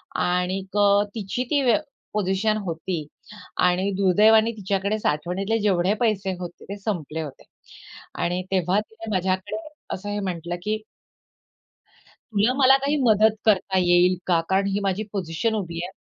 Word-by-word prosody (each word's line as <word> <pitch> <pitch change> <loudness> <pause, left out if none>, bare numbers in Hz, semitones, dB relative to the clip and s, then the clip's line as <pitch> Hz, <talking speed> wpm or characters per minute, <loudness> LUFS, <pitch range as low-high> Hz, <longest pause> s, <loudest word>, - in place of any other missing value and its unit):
आणिक 185 +2 -1 0.4
तिची 220 +3 -2
ती 290 -2 +2
वे 245 - +5 0.4
पोझिशन 210 +1 +1
होती 165 -1 -3 0.6
आणि 180 +2 +1
दुर्दैवाने 215 +4 +5
तिच्याकडे 200 +1 -1
साठवणीतले 190 +6 -1
जेवढे 195 -2 +2
पैसे 205 -5 +1
होते 175 -1 -8
ते 200 - -5
संपले 165 -7 -3
होते 150 -4 -8 0.8
आणि 180 +1 -1
तेव्हा 185 +1 +2
तिने 220 +1 -9
माझ्याकडे 185 - -1 0.4
असं 195 +2 -5
हे 205 0 -2
म्हटलं, 175 -3 -3
की 215 +2 0 1.6
"तुला 210 +4 +3
मला 265 0 +6
काही 280 +2 0
मदत 220 -2 +4
करता 195 -3 +2
येईल 180 0 +4
का? 175 -2 +3
कारण 195 +1 +2
ही 200 +1 0
माझी 195 +2 0
पोझिशन 185 +3 -1
उभी 170 -5 -4
आहे. 185 - -8
195 Hz, 140 wpm, -24 LUFS, 180-215 Hz, 1.6 s, मला